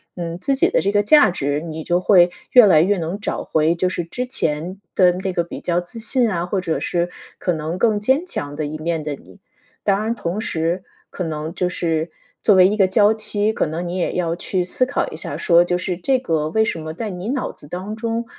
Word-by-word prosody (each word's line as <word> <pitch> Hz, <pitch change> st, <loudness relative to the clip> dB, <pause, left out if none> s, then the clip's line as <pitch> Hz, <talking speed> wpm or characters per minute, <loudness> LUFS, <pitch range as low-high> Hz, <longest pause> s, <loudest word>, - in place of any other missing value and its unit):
嗯， 170 Hz, -1 st, -4 dB
自 275 Hz, +7 st, 0 dB
己 265 Hz, -, +3 dB
的 -, -, +2 dB
这 200 Hz, -, +1 dB
个 205 Hz, 0 st, +3 dB
价 295 Hz, +9 st, +6 dB
值， 145 Hz, -3 st, -2 dB
你 160 Hz, -1 st, -6 dB
就 175 Hz, 0 st, +2 dB
会 180 Hz, -2 st, +6 dB, 0.2 s
越 245 Hz, -3 st, +8 dB
来 155 Hz, -5 st, +6 dB
越 195 Hz, +4 st, +2 dB
能 170 Hz, +4 st, -3 dB
找 -, -, -3 dB
回 155 Hz, +1 st, +2 dB
就 175 Hz, +2 st, 0 dB
是 180 Hz, -1 st, -3 dB
之 250 Hz, +10 st, -4 dB
前 175 Hz, -, -2 dB
的 180 Hz, -1 st, +4 dB
那 190 Hz, +1 st, -3 dB
个 175 Hz, -2 st, +1 dB
比 -, -, -8 dB
较 175 Hz, 0 st, 0 dB
自 175 Hz, +6 st, -12 dB
信 240 Hz, +1 st, +1 dB
啊， 175 Hz, -4 st, -1 dB
或 190 Hz, +2 st, -1 dB
者 165 Hz, -3 st, -1 dB
是 175 Hz, 0 st, -1 dB, 0.3 s
可 180 Hz, -, 0 dB
能 160 Hz, +2 st, -3 dB
更 215 Hz, -2 st, +2 dB
坚 265 Hz, +10 st, +2 dB
强 145 Hz, -, -5 dB
的 155 Hz, -, -2 dB
一 155 Hz, +1 st, -5 dB
面 165 Hz, +1 st, -2 dB
的 150 Hz, -1 st, -4 dB
你。 170 Hz, -, -18 dB, 0.4 s
当 200 Hz, +1 st, +1 dB
然 225 Hz, +1 st, 0 dB
同 205 Hz, -3 st, -3 dB
时 170 Hz, -1 st, -1 dB, 0.3 s
可 180 Hz, -, -5 dB
能 155 Hz, -1 st, -4 dB
就 180 Hz, -2 st, 0 dB
是 165 Hz, -2 st, -1 dB, 0.3 s
作 210 Hz, -, +5 dB
为 185 Hz, -1 st, +7 dB
一 205 Hz, -, 0 dB
个 195 Hz, -3 st, +4 dB
娇 205 Hz, +3 st, +4 dB
妻， 215 Hz, 0 st, -1 dB
可 -, -, 0 dB
能 170 Hz, +3 st, -4 dB
你 180 Hz, +2 st, -3 dB
也 180 Hz, -, -1 dB
要 170 Hz, -2 st, -1 dB
去 180 Hz, +1 st, -2 dB
思 180 Hz, +8 st, -1 dB
考 280 Hz, -, -1 dB
一 -, -, -7 dB
下 -, -, -5 dB
说， 170 Hz, -1 st, +5 dB
就 175 Hz, 0 st, 0 dB
是 180 Hz, 0 st, -2 dB
这 260 Hz, +9 st, +1 dB
个 160 Hz, -10 st, -1 dB
为 220 Hz, +6 st, +2 dB
什 170 Hz, -, -2 dB
么 155 Hz, 0 st, -6 dB
在 215 Hz, +6 st, -4 dB
你 180 Hz, +4 st, -5 dB
脑 265 Hz, 0 st, -2 dB
子 145 Hz, -, -16 dB
当 185 Hz, +7 st, -5 dB
中， 230 Hz, +1 st, -2 dB
180 Hz, 260 characters per minute, -20 LUFS, 165-210 Hz, 0.4 s, 越